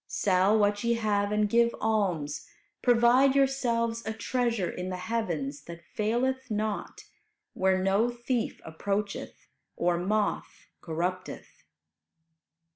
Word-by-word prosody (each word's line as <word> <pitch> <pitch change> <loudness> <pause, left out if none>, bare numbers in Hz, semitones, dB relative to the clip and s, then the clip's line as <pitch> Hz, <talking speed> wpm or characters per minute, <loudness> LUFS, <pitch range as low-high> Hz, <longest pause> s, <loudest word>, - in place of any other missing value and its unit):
Sell 195 +2 +2
what 205 0 +2
ye 235 0 +2
have 205 -2 0
and 210 0 +2
give 235 +2 +3
alms; 185 -10 -1 0.3
provide 245 +3 +5
yourselves 235 -4 +1
a 220 - -3
treasure 230 -3 -1
in 180 +1 -5
the 185 - -3
heavens 175 -9 -3
that 170 0 -10
faileth 250 +5 0
not, 215 -1 -3 0.5
where 190 0 +2
no 195 +5 +2
thief 240 0 -2
approacheth, 200 +5 -4 0.3
or 175 0 +1
moth 205 +3 -1 0.2
corrupteth." 180 +3 -4
210 Hz, 115 wpm, -28 LUFS, 185-235 Hz, 0.5 s, provide